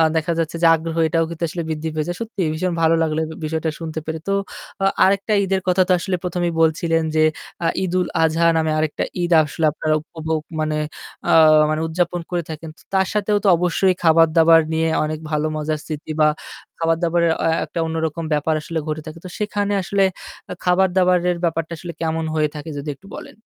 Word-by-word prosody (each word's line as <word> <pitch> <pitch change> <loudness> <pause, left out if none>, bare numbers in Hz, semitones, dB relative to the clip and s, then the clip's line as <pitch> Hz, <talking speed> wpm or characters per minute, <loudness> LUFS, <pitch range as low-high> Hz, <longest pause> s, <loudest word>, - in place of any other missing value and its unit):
দেখা 165 +2 0
যাচ্ছে 165 0 -2
যে 165 - +7
আগ্রহ 165 0 -5
এটাও 165 0 +1
কিন্তু 170 0 -6
আসলে 170 +1 -4
বৃদ্ধি 160 0 -3
পেয়ে 155 -1 -2
যায়। 175 0 -3
সত্যিই 200 -8 -2
ভীষণ 180 +2 -1
ভালো 165 0 +4
লাগলো 155 -1 0
এ - - -2 0.2
বিষয়টা 160 +1 -1
শুনতে 160 -1 -4
পেরে। 160 0 -4
তো 195 - +1 0.5
আ - - +4 0.2
আরেকটা 200 +2 +1
ঈদের 190 0 0
কথা 180 +1 +3
তো - - +1
আসলে 185 0 -1
১ম 180 0 -1
এই 165 - -7
বলছিলেন 165 0 +2
যে, 155 - +4 0.4
আ - - +4 0.2
'ঈদুল 180 0 0 0.2
আজহা' 165 +1 +3
নামে 160 -1 +1
আরেকটা 155 -1 -1 0.2
ঈদ 175 0 -1
আসলে 155 +2 -2
আপনারা 155 0 0
উপভোগ 160 0 -4 0.2
মানে 155 0 0 0.5
আ - - +4 0.4
মানে 155 +1 -1
উদযাপন 175 +1 -1
করে 175 -1 -1
থাকেন। 160 +1 -7
তো - - -20
তার 190 0 +3
সাথেও 210 0 +1
তো - - +1
অবশ্যই 180 +2 +2
খাবার-দাবার 165 0 +6
নিয়ে 160 0 +1
অনেক 155 0 -3
ভালো 150 0 0
মজার 155 0 -2
স্মৃতি 155 0 -6
বা 150 - +6 0.5
খাবার-দাবারের 165 0 +2
আ - - +3
আ - - -1
একটা - - -5
অন্যরকম 160 0 -2
ব্যাপার 150 +2 +1
আসলে 165 +1 -3
ঘটে 155 0 -3
থাকে। 155 +1 -9
তো - - -6
সেখানে 205 -1 -1
আসলে 195 +2 +1 0.5
আ - - -2
খাবার-দাবারের 180 -1 +3
ব্যাপারটা 165 0 -1
আসলে 175 +1 -7
কেমন 160 0 -1
হয়ে 155 -1 +2
থাকে 150 +2 -7
যদি 145 +1 -5
একটু 195 - -19
বলেন? - - -9
165 Hz, 200 wpm, -21 LUFS, 160-180 Hz, 0.5 s, যে